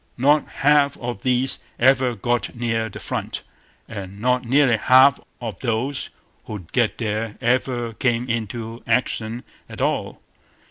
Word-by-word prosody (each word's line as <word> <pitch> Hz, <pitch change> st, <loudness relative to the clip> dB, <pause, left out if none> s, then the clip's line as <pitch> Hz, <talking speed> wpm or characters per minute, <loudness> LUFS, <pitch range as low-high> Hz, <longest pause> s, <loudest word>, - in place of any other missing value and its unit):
Not 145 Hz, +4 st, +3 dB
half 145 Hz, 0 st, +3 dB
of 120 Hz, -5 st, -5 dB
these 130 Hz, +1 st, +2 dB, 0.2 s
ever 130 Hz, -1 st, +3 dB
got 120 Hz, +4 st, -1 dB
near 115 Hz, -1 st, -1 dB
the -, -, -9 dB
front; -, -, -4 dB, 0.4 s
and 100 Hz, 0 st, -8 dB
not 125 Hz, +2 st, +1 dB
nearly 125 Hz, -1 st, +3 dB
half 130 Hz, +4 st, +6 dB, 0.2 s
of 115 Hz, -6 st, -6 dB
those 125 Hz, +3 st, -2 dB, 0.4 s
who 110 Hz, -, -5 dB
did 90 Hz, -4 st, -14 dB
get 120 Hz, -4 st, +1 dB
there 110 Hz, -1 st, -3 dB
ever 120 Hz, -1 st, 0 dB
came 120 Hz, +1 st, 0 dB
into 115 Hz, 0 st, -4 dB
action 115 Hz, -1 st, 0 dB, 0.3 s
at -, -, -9 dB
all. -, -, -1 dB
120 Hz, 140 wpm, -22 LUFS, 115-130 Hz, 0.4 s, half